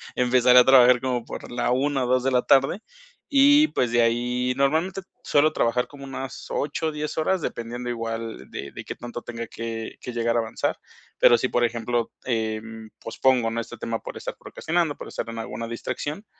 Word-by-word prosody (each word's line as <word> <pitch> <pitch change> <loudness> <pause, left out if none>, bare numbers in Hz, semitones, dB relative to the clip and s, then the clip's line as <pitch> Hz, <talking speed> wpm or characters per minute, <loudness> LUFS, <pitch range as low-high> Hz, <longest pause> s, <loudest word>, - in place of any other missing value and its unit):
Empezaré 125 0 +5
a - - +8
trabajar 125 -2 +7
como 125 -3 -2
por - - -8
la 120 0 0
1 135 +1 +1
o - - -3
2, 125 0 +2
de 135 - +1
la 125 -1 +3
tarde 135 +8 +3 0.5
y 290 +1 +6
pues, 125 -2 0
de 120 0 +4
ahí 125 +2 +1
normalmente 160 +8 +1 0.2
suelo 150 +2 +3
trabajar 125 -3 +1
como 140 -1 -11
unas 135 0 -7
8 150 +2 -2
o - - -1
10, 150 0 -4
horas, 175 +3 +1
dependiendo 120 -1 -4
igual 115 -1 -5
de 70 0 -7
de - - -8
qué - - -6
tanto 120 0 -7
tenga 115 -1 -6
que 115 0 -6
que 125 - -7
llegar 115 0 0
a - - +4
avanzar. 110 -1 -2 0.4
Pero, 120 - +7
si 125 - -1
por 120 0 +2
ejemplo, 115 0 -2
em, 110 -2 -3
pospongo, 120 0 +1
¿no?, 115 - -2
este, 115 +1 -6
tema 115 0 -3
por - - -8
estar - - -6
procrastinando, 165 -3 -2
por - - -9
estar - - -5
en 115 0 -6
alguna 115 +1 -5
distracción, 130 - -5
125 Hz, 200 wpm, -24 LUFS, 115-135 Hz, 0.5 s, a